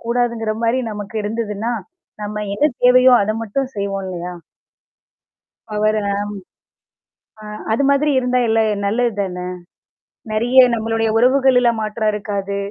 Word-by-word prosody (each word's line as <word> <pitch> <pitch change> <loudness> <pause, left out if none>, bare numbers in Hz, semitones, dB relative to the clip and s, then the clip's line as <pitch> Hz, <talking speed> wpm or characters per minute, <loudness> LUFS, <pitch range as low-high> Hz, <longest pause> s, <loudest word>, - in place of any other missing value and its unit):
கூடாதுங்கிற 235 -2 0
மாரி 230 +2 +2
நமக்கு 210 0 -7
இருந்ததுன்னா, 215 +1 -3 0.5
நம்ம 210 0 -4
என்ன 300 +8 +2
தேவையோ 255 +1 +6
அத 215 - -1
மட்டும் 255 +5 -3
செய்வோம் 200 -1 -3
இல்லையா? 180 0 -5 1.4
பவர 215 0 +1 0.2
ஆம். 200 +1 -1 1.2
ஆ - - -12 0.3
அது 230 +6 +1
மாதிரி 285 +2 +2
இருந்தா 250 0 +1
எல்ல 225 0 +2 0.3
நல்லது 235 +3 +1
தானே? 180 -2 -4 0.9
நெறைய 240 +4 +3
நம்மளுடைய 225 0 0
உறவுகள்லாம் 250 -1 +3
மாற்றம் 215 0 -1
இருக்காது. 200 -1 -3
225 Hz, 120 wpm, -19 LUFS, 205-245 Hz, 1.4 s, தேவையோ